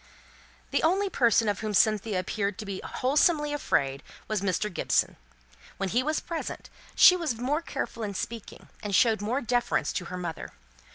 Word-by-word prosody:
The - - +1
only 380 +4 +2
person 230 -3 +3
of 205 -1 0
whom 215 -1 -3
Cynthia 215 -1 +2
appeared 200 +1 -2
to 215 - -6
be 195 -1 -5
wholesomely 295 +3 +1
afraid 140 - 0 0.3
was 215 -3 -1
Mr. 195 +1 -1
Gibson. - - +1 0.6
When 195 -1 -2
he 240 +7 +2
was 305 +3 0
present 335 -1 -6 0.2
she 365 - +8
was 325 -9 -2
more 265 +7 -1
careful 235 -7 -5
in 205 -2 -4
speaking, 230 +2 -6
and 205 -2 -2
showed 220 -1 +4
more 240 +7 -1
deference 245 0 0
to 180 - -3
her 180 - -6
mother. 170 -4 -6
220 Hz, 170 wpm, -27 LUFS, 200-280 Hz, 0.6 s, she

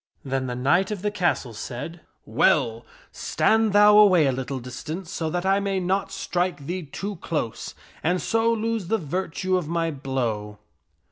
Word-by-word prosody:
Then 135 -1 -1
the 125 - -3
knight 145 +10 +2
of 205 -3 -4
the 210 - 0
castle 175 - 0
said, 125 +9 -6 0.2
" - - -46
Well, 115 0 +3 0.2
stand 220 -1 +2
thou 210 +1 +7
away 185 -7 +6
a 135 - +3
little 130 +1 -4
dis 125 0 -8
tance 165 +3 -6
so 160 -1 -2
that 175 +3 -2
I 195 +1 +3
may 195 -1 -1
not 190 +2 -1
strike 180 -5 -2
thee 180 +4 -3
too 190 +6 -6
close, 150 -9 -4 0.3
and 180 +3 +1
so 225 +3 +1
lose 225 -3 -1
the 225 - +2
virtue 185 +2 -1
of 175 -4 -3
my 165 0 0
blow." 120 -7 -3
175 Hz, 180 wpm, -24 LUFS, 135-195 Hz, 0.3 s, thou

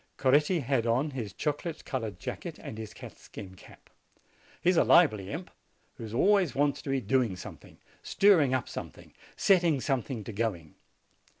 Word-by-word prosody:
Coretti 150 +6 +3
had 120 -3 0
on 130 +6 +1
his 115 -7 -5
chocolate 150 - -4
colored 115 -8 -4
jacket - - -6
and 110 - -8
his 110 -1 -7
catskin 95 -2 -11
cap. 95 - -17 0.7
He 175 - +3
is - - 0
a - - +6
lively 110 - +4
imp, 175 - -6 0.5
who 110 -1 -7
always 195 -2 +3
wants 145 0 +1
to - - -7
be 135 0 +1
doing 125 -6 +1
some 90 - -9
thing, - - -18 0.2
stirring 180 -10 +4
up 130 - -2
something, - - -9 0.2
setting 175 -7 +3
something 125 -2 -2
to 115 - -7
go 110 -1 0
ing. 80 -3 -16
130 Hz, 170 wpm, -29 LUFS, 110-155 Hz, 0.7 s, a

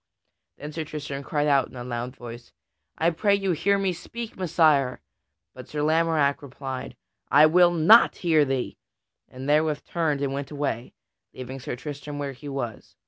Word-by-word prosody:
Then 150 +1 -7
Sir 160 +1 -4
Tristram 145 -2 -6
cried 145 +1 -1
out 140 -3 +3
in - - -16
a 120 - -6
loud 120 +1 -4
voice, 120 -1 -10 0.4
"I 165 +2 +2
pray 200 +5 +2
you, 195 -2 0
hear 185 +5 +2
me 195 -2 0
speak, 230 +6 -8
Messire!" 155 -7 +2 0.5
But 130 -1 -11
Sir 150 -1 -3
Lamorack 160 -2 +2
replied, 135 -1 -7 0.3
"I 145 +3 +7
will 175 +3 +6
not 175 +7 +6
hear 160 -4 +3
thee!" 135 -2 -2 0.5
and 130 +2 -8
therewith 150 0 +1
turned 155 -5 -1
and 140 -1 -1
went 140 0 -4
away, 140 -5 -3 0.4
leaving 130 +1 -7
Sir 125 - -5
Tristram 145 +2 -7
where 140 -1 -4
he 145 +3 -9
was. 120 -6 -6
145 Hz, 170 wpm, -25 LUFS, 135-165 Hz, 0.5 s, I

